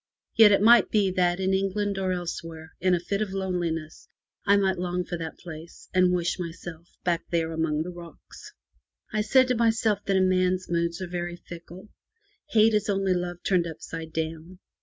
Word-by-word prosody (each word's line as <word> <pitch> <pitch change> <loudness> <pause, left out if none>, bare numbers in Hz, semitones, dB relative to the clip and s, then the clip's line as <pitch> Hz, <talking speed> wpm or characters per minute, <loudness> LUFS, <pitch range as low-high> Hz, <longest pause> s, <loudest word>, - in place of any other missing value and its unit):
Yet 220 -2 +8
it 200 0 +3
might 235 +2 +7
be 200 -3 +2
that 180 -1 +1
in 190 0 +1
England 195 +1 -1
or 190 -1 0
elsewhere, 165 -2 -5
in 185 0 +3
a - - -1
fit 200 +4 -3
of 205 -3 -2
loneliness, 175 -5 -3 0.4
I 200 +1 +6
might 190 -2 +1
long 180 0 -2
for - - -4
that 160 -1 -6
place, 165 -1 -11
and 185 -1 +4
wish 175 0 -1
myself 170 -1 -7 0.2
back 170 -2 +1
there 165 -1 0
among 160 -1 -1
the 180 - -6
rocks. 170 -1 -12 0.6
I 215 - +1
said 255 +4 +4
to 250 - +2
myself 225 -2 +1
that 195 -1 +2
a - - +3
man's 185 0 +1
moods 170 +1 -1
are - - -4
very 175 0 -4
fickle. 175 +3 -12 0.6
Hate 220 -3 +4
is 210 -1 +1
only 195 -1 +1
love 175 -1 -4
turned 180 -3 +2
upside 160 0 -7
down. 160 +3 -5
180 Hz, 185 wpm, -26 LUFS, 170-195 Hz, 0.6 s, Yet